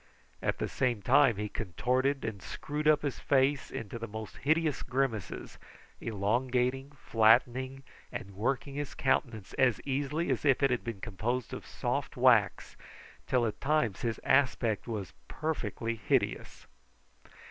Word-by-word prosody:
At - - 0
the - - -2
same 120 -5 -1
time 135 -1 +5
he 105 +1 -2
contorted 125 +8 -1
and 105 -4 -4
screwed 150 +8 -4
his 150 -3 +2
face 140 +1 +2
up - - -10
into 115 +2 -6
the 115 - -5
most 110 0 -7
hideous 155 0 +1
grimaces, 125 -7 -2 0.4
elongating, 125 +5 0 0.2
flattening, 125 +4 +3 0.3
and 100 - -6
working 130 +7 -2
his 145 0 -4
countenance 115 -6 0
as 125 -4 +4
easily 145 +3 -1
as 130 - -1
if 140 -1 +3
it 135 - +4
had 120 - 0
been 115 -5 -5
composed 115 +4 -3
of - - -7
soft - - -3
wax, - - +3 0.5
till 125 -2 +2
at 110 -2 -4
times 145 - +1
his 115 -2 -2
aspect 125 -6 +2
was 100 -9 -4
perfectly 115 -7 -3
hideous. 110 - -1
125 Hz, 140 wpm, -31 LUFS, 110-135 Hz, 0.5 s, time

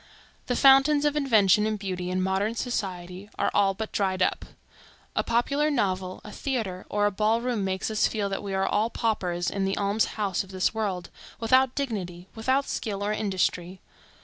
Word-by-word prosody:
The 245 - 0
fountains 275 +3 +6
of 295 0 +2
invention 215 -7 +4
and 215 -1 -1
beauty 185 -3 -4
in 185 0 0
modern 195 +4 0
society 190 -5 -4
are - - +1
all 195 -1 +3
but 220 +2 -5
dried 190 -2 +1
up. - - -1 0.7
A - - +1
popular 280 +6 +1
novel, 185 -8 -1
a 210 - -9
theatre, 215 -10 -3
or 205 0 +1
a 205 - +2
ball 215 +3 +1
room 240 -4 -1
makes 190 +2 -2
us 215 - +2
feel 210 -2 -2
that 195 - -3
we 200 -2 -4
are 190 0 +1
all 210 +3 +1
paupers 180 -8 -1
in 195 - -2
the 195 0 -1
alms 205 +2 +1
house 200 -4 0
of 190 - -16
this 185 +1 0
world, 195 -6 -3 0.3
without 255 +3 +3
dignity, 185 -10 -4
without 260 +5 0
skill 200 -3 -3
or 210 +1 0
industry. 185 -3 -1
205 Hz, 185 wpm, -26 LUFS, 190-230 Hz, 0.7 s, fountains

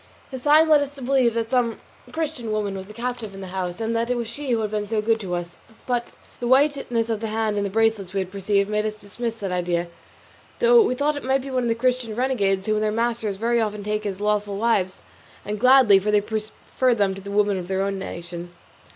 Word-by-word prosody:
This 260 -1 -6
sign 305 +4 +6
led 305 -2 +6
us 285 0 -4
to 275 - -10
believe 250 -3 +2
that 230 -1 -2
some 245 -3 +1 0.3
Christian 305 -8 -3
woman 210 -2 -1
was 190 +1 -7
a - - -9
captive 235 -3 -4
in 195 - -8
the 190 - -7
house, 180 0 -3
and 225 0 -1
that 230 +1 0
it 250 - +1
was 235 -1 -3
she 285 +4 -6
who 230 -2 +2
had 210 -1 -2
been 210 -1 -2
so 220 +1 0
good 225 +1 +1
to 185 -4 -3
us; 175 0 -5 0.3
but 245 -1 -2 0.3
the 240 - -2
whiteness 265 -3 +2
of 225 -2 -1
the 225 - -3
hand 220 -1 -1
and 205 - 0
the 200 - -1
bracelets 220 -2 +1
we 195 - -1
had 185 -1 -3
perceived 200 0 +1
made 210 0 0
us 215 0 -2
dismiss 220 +3 -5
that 200 -4 -5
idea, 175 -1 -1 0.7
though 480 0 +6
we 330 - +1
thought 295 +3 +1
it - - -6
might 265 0 +1
be 275 - -7
one 255 -1 +1
of 240 - -1
the 230 - +2
Christian 245 -2 0
renegades 205 -7 +1
whom 215 -1 +1
their 215 0 0
masters 225 -2 -1
very 235 +2 +1
often 210 -1 -2
take 210 +1 -2
as 195 -1 -4
lawful 210 -1 0
wives, 200 -4 0 0.4
and 210 +1 -3
gladly, 250 -5 +7
for 205 +2 -2
they 210 0 +4
prefer 220 +4 -1
them 200 -3 +1
to 195 - -9
the 200 - -9
women 205 -1 +2
of 175 - -7
their 190 0 0
own 195 0 -2
nation. 175 -1 -7
215 Hz, 245 wpm, -23 LUFS, 200-245 Hz, 0.7 s, gladly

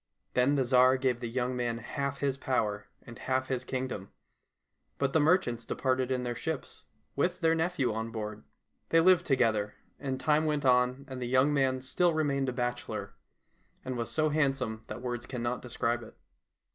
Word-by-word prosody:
Then 125 +3 +3
the 135 - +2
Tsar 130 +1 +5
gave 130 -2 0
the 120 -1 -4
young 125 +1 -1
man 120 -2 -1
half 140 +3 -4
his 140 -2 +1
power 105 -7 -1 0.2
and 120 - -11
half 130 0 -1
his 130 -1 -1
kingdom, 130 -7 -4 0.9
but 140 -1 0
the 160 - +4
merchants 145 -7 +2
departed 130 +1 0
in 130 -1 0
their 120 -1 -2
ships, 160 +4 -5 0.3
with 175 +6 0
their 165 -1 +4
nephew 165 -7 0
on 110 +1 -3
board. 110 -1 -5 0.5
They 165 - +5
lived 180 0 +5
together, 110 -6 +2 0.2
and 135 -2 -3
time 155 0 +2
went 150 -2 0
on 125 +1 +3
and 130 -1 -7
the 120 - -2
young 130 +4 +3
man 130 -2 +1
still 170 +6 +1
remained 140 -4 +1
a - - -1
bachelor, 120 0 -3 0.7
and 130 0 -3
was 115 -1 -3
so 155 -1 +1
handsome 135 -7 0
that 120 - -7
words 120 0 -4
cannot 125 -1 -3
describe 120 -1 -1
it. 115 - -13
130 Hz, 180 wpm, -30 LUFS, 120-140 Hz, 0.9 s, Tsar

